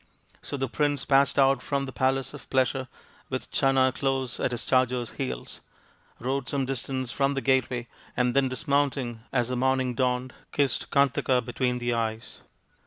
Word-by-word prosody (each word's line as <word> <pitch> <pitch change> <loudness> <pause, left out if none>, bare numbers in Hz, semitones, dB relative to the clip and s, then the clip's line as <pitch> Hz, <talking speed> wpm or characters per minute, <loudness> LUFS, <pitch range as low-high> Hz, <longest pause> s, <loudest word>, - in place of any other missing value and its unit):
So 145 - -5
the 135 0 -1
prince 145 +1 0
passed 140 -1 +4
out 135 -2 +4
from 140 +1 -1
the 130 - -6
palace 130 +1 0
of 145 - -11
pleasure 130 0 +1 0.4
with - - -4
Channa 135 -1 +3
close 135 -3 -1
at - - +1
his 120 -2 -4
charger's 125 -2 +1
heels, 135 -2 -5 0.6
rode 130 +2 -2
some 140 -2 0
distance 130 -1 -3
from 140 0 +1
the - - +1
gateway, 125 -1 +1 0.3
and 125 0 +2
then 135 -1 +3
dis 130 +5 -6
mounting 140 -5 +1
as 125 -2 +1
the 125 - -1
morning 130 0 +1
dawned, 125 +1 0 0.2
kissed 140 -3 0
Kantaka 140 -2 +3
between 125 0 0
the 120 0 -1
eyes. 115 -1 -3
130 Hz, 170 wpm, -27 LUFS, 125-135 Hz, 0.6 s, passed